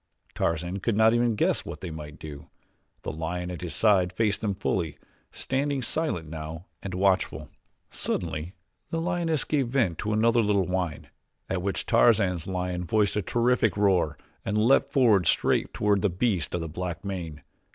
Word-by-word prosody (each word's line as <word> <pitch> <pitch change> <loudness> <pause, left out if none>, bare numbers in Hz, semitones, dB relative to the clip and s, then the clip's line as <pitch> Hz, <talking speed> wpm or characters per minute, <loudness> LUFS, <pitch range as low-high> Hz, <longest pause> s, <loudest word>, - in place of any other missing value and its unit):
Tarzan 85 +4 -1
could 105 +1 0
not 110 +1 +5
even 120 -1 +2
guess - - +1
what - - -8
they 90 - -5
might 75 -2 -8
do. 75 +1 -9 0.5
The - - -3
lion 90 +3 -4
at 90 - -6
his 85 -4 -5
side 95 -5 +3
faced 105 +1 0
them 105 -3 -1
fully, 85 -5 -1 0.3
standing 135 0 -2
silent 115 - -1
now 80 +2 -7 0.2
and 95 -2 -5
watchful. 90 -6 +1 0.4
Suddenly 80 +6 -3 0.3
the 165 - -2
lioness 170 -3 0
gave 140 -5 0
vent 115 - 0
to 105 - -2
another 115 +2 +3
little 100 -3 +2
whine, 90 -5 -3 0.4
at 95 -2 0
which 100 +1 -2
Tarzan's 100 -8 +3
lion 90 -1 -2
voiced 105 +3 +1
a 105 - +1
terrific 115 +1 +1
roar 95 -7 +2 0.3
and 105 - -1
leaped 115 +6 +4
forward 110 - +4
straight - - +2
toward 105 -2 +1
the 105 - +2
beast 95 -2 0
of 90 - -2
the 80 - -3
black 90 +3 -5
mane. 85 -6 -5
95 Hz, 170 wpm, -27 LUFS, 85-115 Hz, 0.5 s, not